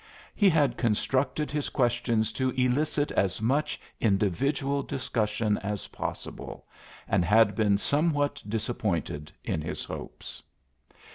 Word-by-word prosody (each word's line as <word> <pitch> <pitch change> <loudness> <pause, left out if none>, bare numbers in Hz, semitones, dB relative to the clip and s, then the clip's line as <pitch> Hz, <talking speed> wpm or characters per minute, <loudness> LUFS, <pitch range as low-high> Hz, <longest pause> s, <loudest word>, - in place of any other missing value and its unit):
He 205 -3 +5
had 155 -4 +2
constructed 130 +6 0
his 150 -1 -1
questions 120 -3 +1
to 130 +1 0
elicit 145 +4 +1
as 95 -3 +1
much 140 +7 0 0.2
individual 135 - +1
discussion 110 -5 -1
as 100 0 -4
possible - - -6 0.4
and 95 -2 +2
had 105 +4 +5
been 105 -3 +3
somewhat 145 +4 +1
disappointed 100 - -2
in - - -1
his - - -4
hopes. - - -8
120 Hz, 115 wpm, -28 LUFS, 105-140 Hz, 0.4 s, He